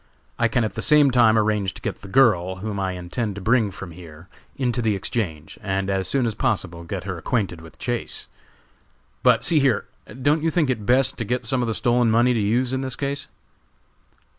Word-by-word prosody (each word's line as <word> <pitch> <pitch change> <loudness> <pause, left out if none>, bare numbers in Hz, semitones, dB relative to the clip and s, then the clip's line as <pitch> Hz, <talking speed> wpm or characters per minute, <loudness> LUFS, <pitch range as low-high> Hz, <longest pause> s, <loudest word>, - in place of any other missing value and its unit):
I 115 - +4
can 120 +1 +1
at 110 -3 -2
the - - -4
same 150 -2 +5
time 115 -3 +5
arrange 105 -3 0
to - - -10
get - - -4
the - - -10
girl, 95 -6 +3
whom 100 +2 -5
I 95 -1 -1
intend 95 +4 -4
to - - -6
bring 115 +1 +2
from 95 -1 -9
here, 80 0 -13 0.3
into 125 -3 -1
the 110 -3 +1
Exchange, 90 -6 -4
and 95 -1 -1
as 95 -1 0
soon 135 -3 +1
as 115 - -1
possible 95 -9 -2
get 90 +2 -5
her 95 -3 -5
acquainted 95 -4 -2
with 80 0 -14
Chase. 120 -1 -3 0.9
But - - +4
see 160 - +4
here, 135 -6 +2 0.4
don't 150 +3 +3
you 165 - +1
think 160 -5 +1
it 110 -5 -4
best 130 +2 +3
to 115 - -1
get 125 +3 -2
some 130 -2 0
of 120 - -1
the 115 - -1
stolen 120 -1 +2
money 120 +3 +4
to 115 - 0
use 120 +5 +1
in 130 - -1
this 130 -2 -4
case?" 140 0 -3
110 Hz, 215 wpm, -23 LUFS, 95-125 Hz, 0.9 s, same